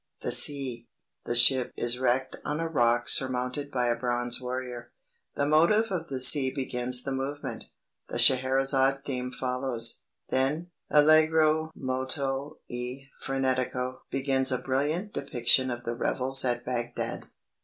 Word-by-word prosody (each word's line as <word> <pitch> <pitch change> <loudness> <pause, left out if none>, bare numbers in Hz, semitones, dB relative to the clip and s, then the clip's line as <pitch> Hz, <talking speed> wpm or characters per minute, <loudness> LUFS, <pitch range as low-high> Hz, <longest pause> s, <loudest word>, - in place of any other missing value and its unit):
THE - - -2
SEA. 130 -5 +3 0.4
THE 120 - -2
SHIP 125 +1 +4
IS 120 +1 -2
WRECKED 130 +1 0
ON 150 +1 -3
A 165 - -1
ROCK 120 -6 +1
SURMOUNTED 130 +2 0
BY 125 -3 -1
A 120 - +1
BRONZE 120 0 -2
WARRIOR 125 -1 -6 0.4
The 140 - 0
motive 170 +9 +3
of 170 -3 -3
the 135 -2 -4
Sea 130 +1 +6
begins 125 -2 -2
the 135 - -4
movement; 135 +2 -5 0.4
the - - -4
Scheherazade 135 +1 +3
theme 125 -2 -4
follows; 125 -2 -2 0.3
then 150 +7 -1 0.2
(Allegro 155 +1 +4
molto 135 +2 -3
e 125 +3 -7
frenetico) 130 -1 -2
begins 135 -1 0
a 130 - +1
brilliant 150 +11 -2
depiction 130 -1 +2
of 120 -1 -5
the 120 - -3
revels 130 +2 +2
at 120 -1 -1
Bagdad. 120 -1 -4
130 Hz, 135 wpm, -27 LUFS, 125-140 Hz, 0.4 s, Sea